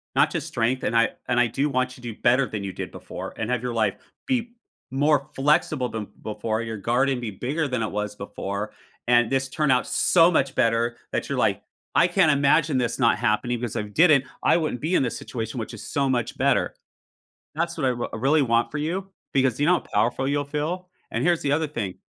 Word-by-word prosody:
not - - +4
just - - -3
strength, 120 +3 0
and 115 - -1
I 115 0 +4 0.2
and 120 - +2
I 120 - +4
do 135 +6 -1
want 130 -1 0
you 125 - -16
to 120 -2 -5
do - - -22
better 125 +3 +4
than 105 -2 -5
you 95 - -4
did - - -6
before - - -8
and 110 - -3
have 125 -2 0
your 125 -1 -2
life 110 -2 +1 0.3
be 245 -3 -1 0.4
more 145 +1 +2
flexible 135 -3 +2
than 110 -2 -5 0.2
before, 110 +1 -2
your 115 -1 -5
garden 125 +5 +1
be 120 -3 -4
bigger 140 - -2
than 125 -3 -2
it 110 - -3
was 105 0 -3
before, 100 0 -5 0.4
and 120 -1 +4
this 135 0 0
turn 150 +1 +1
out 125 -1 +3
so 170 0 +4
much 135 -5 +1
better 115 +1 +2 0.2
that - - -2
you're - - -2
like, - - +1 0.3
"I 175 - +6
can't 175 -3 +4
imagine 145 +1 +3
this 120 -2 0
not 115 -3 +3
happening, 120 +3 0
because 120 -3 -4
if 105 - -2
it 105 - -16
didn't, 150 - +5 0.2
I - - +5
wouldn't 155 -7 -2
be 165 +5 0
in - - +3
this 125 - -2
situation 115 0 -5
which 110 - -5
is - - -8
so 140 -3 0
much 120 -3 -1
better." - - +1 0.8
That's 170 +2 -2
what 150 - 0
I - - +4
r 120 -1 -3
really 145 +5 +3
want 115 -2 +1
for 150 - -4
you 180 +6 -3 0.2
because, 130 -3 +2
you 145 - +2
know 180 - +6
how 175 - +2
powerful 120 +5 0
you'll 145 +1 0
feel, 155 +6 -3 0.2
and - - -1
here's 175 -2 +2
the 140 - 0
other 155 +2 +1
thing. 105 -10 -4
130 Hz, 230 wpm, -24 LUFS, 115-150 Hz, 0.8 s, I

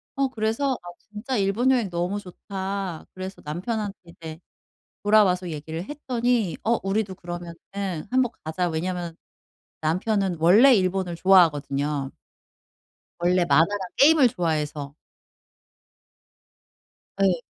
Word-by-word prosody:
어 275 -1 +1
그래서 235 +3 -1
'아 175 - -13
진짜 215 +5 -6
일본 200 +6 +1
여행 235 -7 +1
너무 175 +4 -2
좋다.' 190 -1 -5
그래서 185 +1 -7
남편한테 200 +6 -3
이제 165 -1 -10 0.6
돌아와서 195 -4 +3
얘기를 160 +2 -5
했더니 245 - -1
"어 230 +1 +2
우리도 195 0 -1
그러면은 175 -1 -7 0.6
한번 255 -2 +2
가자." 175 +3 -1
왜냐면 170 +1 -3 0.7
남편은 185 +3 0
원래 215 +11 +7
일본을 185 -2 0
좋아하거든요 150 -6 +2 1.1
원래 175 0 +2
만화랑 165 +8 +3 0.2
게임을 290 -2 +6
좋아해서. 150 -5 -2 2.3
예. 185 -2 +4
185 Hz, 260 characters per minute, -24 LUFS, 170-215 Hz, 2.3 s, 원래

